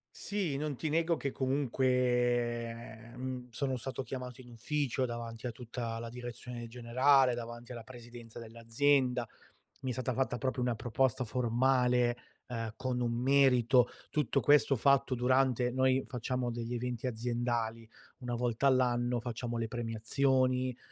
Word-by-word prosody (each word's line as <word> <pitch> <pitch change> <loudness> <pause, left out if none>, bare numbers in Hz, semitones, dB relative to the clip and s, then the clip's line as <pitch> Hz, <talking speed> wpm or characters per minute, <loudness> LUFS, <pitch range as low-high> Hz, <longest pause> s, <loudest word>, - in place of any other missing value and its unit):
Sì, 190 -9 -2
non 150 -2 -2
ti 155 +2 -3
nego 165 +1 +2
che 140 -3 -3
comunque, 120 -3 0
mhmm, 125 -1 -5
sono 130 +2 -2
stato 135 +2 -4
chiamato 125 -1 -7
in 125 - -15
ufficio 130 +2 -1
davanti 120 0 -6
a 120 - -2
tutta 115 -1 -5
la 115 0 -6
direzione 120 0 -7
generale, 125 +2 +3
davanti 120 +1 -7
alla 120 -2 -7
presidenza 120 -1 -11
dell'azienda, 120 +2 +1 0.6
mi 130 - -3
è 125 - -1
stata 130 +1 -2
fatta 130 -1 0
proprio 130 0 -2
una 125 -1 0
proposta 125 +3 0
formale, 125 +1 +2 0.3
eh, 115 -3 -4
con 125 -1 -2
un 120 - 0
merito. 125 -1 +4 0.2
Tutto 145 -2 +1
questo 145 -1 +4
fatto 135 +1 +3
durante 125 0 +2
noi 130 +1 +2
facciamo 125 0 -2
degli 120 +1 -4
eventi 125 +1 -3
aziendali, 115 -1 -2 0.3
una 125 -2 -3
volta 120 +2 +1
all'anno 125 -2 +2
facciamo 120 0 -4
le 115 - -1
premiazioni, 125 +2 0
125 Hz, 140 wpm, -32 LUFS, 120-130 Hz, 0.6 s, merito